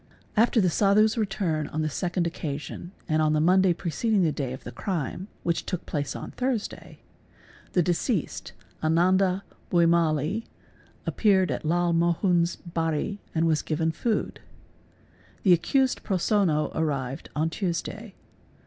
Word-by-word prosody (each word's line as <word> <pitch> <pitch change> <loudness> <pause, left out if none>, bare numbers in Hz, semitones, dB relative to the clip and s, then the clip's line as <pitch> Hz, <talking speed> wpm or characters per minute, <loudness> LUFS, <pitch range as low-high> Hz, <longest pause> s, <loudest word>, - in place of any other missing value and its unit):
After 230 +2 +4
the 185 -4 +3
Sadhu's 210 +4 +4
return 195 -8 -1
on 155 +1 -2
the - - 0
second 175 +3 -1
occasion 160 +1 -5 0.2
and 155 -1 +2
on 155 0 +3
the 155 - +2
Monday 185 +3 +4
preceding 180 +5 0
the 160 - +2
day 135 -3 -3
of 130 - -7
the - - -7
crime, 185 0 -3 0.2
which 170 -1 0
took 180 -3 -4
place 145 -2 -3
on - - -6
_ - - -24
Thursday, 250 -4 -3 0.7
the 180 - +3
deceased 175 - -1 0.3
Ananda 185 +4 +3 0.3
Bhuimali 170 +3 +2 0.6
appeared 190 -4 +3
at - - -3
Lal 175 +2 +2
Mohun's 170 +1 +2
bari 165 +3 -2
4 - - -32
and 165 +1 +2
was 160 -2 +2
given 160 +1 0
food. 215 +7 -2 1.0
The 185 - +6
accused 260 - +2
Prosonno 185 -5 +1
arrived 140 -4 -2
on 160 +2 0
Tuesday. 195 +4 -4
170 Hz, 140 wpm, -26 LUFS, 155-195 Hz, 1.0 s, The